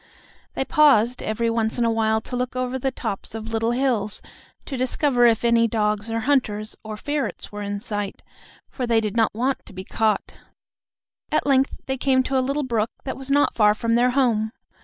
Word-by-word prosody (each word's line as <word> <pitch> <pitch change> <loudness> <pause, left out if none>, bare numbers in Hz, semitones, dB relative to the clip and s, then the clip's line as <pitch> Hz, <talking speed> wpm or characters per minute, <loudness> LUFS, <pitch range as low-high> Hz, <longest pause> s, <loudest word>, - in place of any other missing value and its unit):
They 265 - -1
paused 265 -6 +4
every 230 +2 -1
once 225 0 0
in 240 - +2
a 230 - +2
while 220 -1 +1
to 250 - -6
look 250 0 -2
over 255 +1 -2
the 270 - 0
tops 225 -4 -5
of 225 0 -6
little 225 +1 +1
hills 240 -5 0 0.5
to 275 - -5
discover 255 0 +2
if 230 0 +2
any 230 0 +4
dogs 210 -1 -1
or 225 0 -1
hunters 220 -5 0
or 215 -1 -6
ferrets 290 +4 -3
were 205 0 -6
in 205 0 -3
sight, 205 -1 -5 0.4
for 250 -3 -4
they 230 -1 +3
did 215 -1 -3
not 225 -2 +2
want 260 +4 -1
to 210 - -12
be 185 0 -7
caught. 215 +2 -1 0.9
At 305 - +1
length 270 -1 +2
they 265 0 -2
came 260 0 +2
to 270 - -2
a - - +2
little 275 +3 -1
brook 230 -4 0
that 265 - -4
was 270 +1 -8
not 285 +1 +3
far 210 -2 +4
from 230 +1 -1
their 240 +2 +4
home. 235 -5 +1
230 Hz, 200 wpm, -23 LUFS, 220-260 Hz, 0.9 s, paused